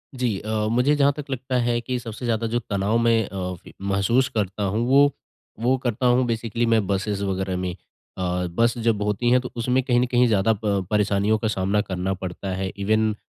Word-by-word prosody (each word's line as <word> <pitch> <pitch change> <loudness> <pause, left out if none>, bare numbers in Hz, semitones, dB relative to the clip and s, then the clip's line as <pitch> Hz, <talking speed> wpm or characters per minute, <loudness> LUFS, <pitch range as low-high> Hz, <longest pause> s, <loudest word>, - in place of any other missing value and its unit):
जी। 125 -5 -1
अ, 110 - -6 0.2
मुझे 125 +5 +3
जहाँ 140 -1 +3
तक 145 -1 -7
लगता 130 0 -3
है 120 -1 +1
कि 125 +2 -3
सबसे 115 0 -7
ज़्यादा 115 -1 0
जो 120 +2 0
तनाव 100 +2 +1
मैं 115 -1 +3
अ, 90 -1 -4
फी - - -14
महसूस 100 +6 +2
करता 105 -4 -2
हूँ, 105 +4 0
वो 140 +2 +5 0.5
वो 125 +3 +2
करता 125 -1 -2
हूँ 125 +1 +3
बेसिकली 115 0 -1
मैं 115 -3 +2
बसेज़ 100 +1 -1
वगैरह 95 -1 -2
में। 90 -1 -3 0.4
अ, 90 -1 -1
बस 115 +7 +1
जब 115 -3 0
होती 105 +4 0
हैं, 125 - +5
तो 125 - -7
उसमें 125 +2 +1
कहीं 120 -1 +2
न 125 - +3
कहीं 125 0 +4
ज़्यादा 110 0 +3
प 100 -3 0
परेशानियों 105 0 +2
का 110 - -2
सामना 100 0 +1
करना 95 -1 -2
पड़ता 95 +1 -6
है। 95 0 -2
इवेन 110 +2 +1
110 Hz, 210 wpm, -23 LUFS, 100-120 Hz, 0.5 s, वो